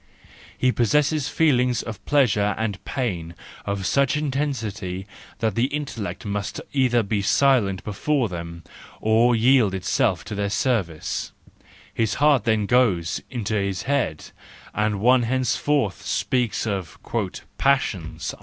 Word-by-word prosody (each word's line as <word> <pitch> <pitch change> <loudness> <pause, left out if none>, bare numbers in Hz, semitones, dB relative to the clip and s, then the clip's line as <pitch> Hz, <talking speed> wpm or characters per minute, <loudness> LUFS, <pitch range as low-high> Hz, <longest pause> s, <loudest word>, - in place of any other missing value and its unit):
He 130 - +3
possesses 145 +5 +1
feelings 125 -7 +2
of 110 -3 -8
pleasure 105 -8 +3
and 105 -3 -3
pain 90 - -3 0.3
of 100 -1 -2
such 140 +5 +2
intensity 125 -11 -3 0.3
that 110 -2 0
the 115 +4 +2
intellect 135 -8 -4
must 100 -1 -3
either 125 -4 +3
be 100 0 -1
silent 105 -4 +2
before 125 +5 0
them, 85 -2 -7 0.4
or 115 +2 +3
yield 115 -4 +4
itself 95 0 0
to 110 - -6
their 100 0 -1
service: 100 -8 -1 0.6
his 110 -2 0
heart 145 -5 +3
then 110 -2 +2
goes 100 -8 +2
into 115 -4 -3
his 100 -3 -1
head, 135 - -1 0.4
and 105 -1 0
one 125 +2 +5
henceforth 130 -1 0
speaks 125 -4 0
of 95 -6 -3 0.6
"passions." 120 -12 0
115 Hz, 125 wpm, -23 LUFS, 100-130 Hz, 0.6 s, one